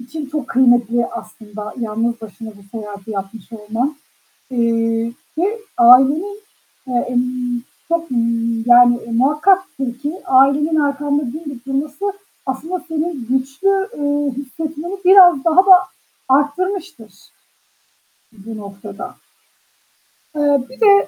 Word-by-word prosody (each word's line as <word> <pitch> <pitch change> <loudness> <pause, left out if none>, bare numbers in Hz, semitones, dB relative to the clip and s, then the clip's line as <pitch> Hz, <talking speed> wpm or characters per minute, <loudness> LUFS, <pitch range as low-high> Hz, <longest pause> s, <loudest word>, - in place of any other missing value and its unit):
için 280 +5 -7
çok 280 -1 -5
kıymetli 240 -2 +3
aslında 210 -2 -9
yalnız 230 +1 -2
başına 220 +1 -9
bu 200 +2 -11
seyahati 205 -1 -9
yapmış 195 0 -6
olman. 225 +7 -3 0.5
Eee, 230 -1 0 0.3
ve 405 +7 0 0.2
ailenin, 280 - +5 0.4
eee, 245 -2 -1
ımm, 245 -1 -1 0.3
çok, 335 -1 -1
ııı, 245 -2 +1 0.5
yani 240 0 +6
muhakkaktır 295 0 +1
ki 290 +3 -3
ailenin 280 +4 +3
arkanda 285 -1 0
dimdik 280 -1 -8
durması 290 +8 -2 0.3
aslında 315 +8 -4
seni 320 +2 -2 0.2
güçlü, 285 - 0
eee, 290 -1 0
hissetmeni 310 +6 -6
biraz 360 -6 +7
daha 330 -1 +2
da 375 -1 +10 0.5
arttırmıştır 290 - -1 1.3
bu 225 -1 -7
noktada. 200 0 -9 1.2
Eee, 285 -3 +2
bir 260 - -15
de 400 -2 +6
265 Hz, 110 wpm, -18 LUFS, 235-310 Hz, 1.3 s, da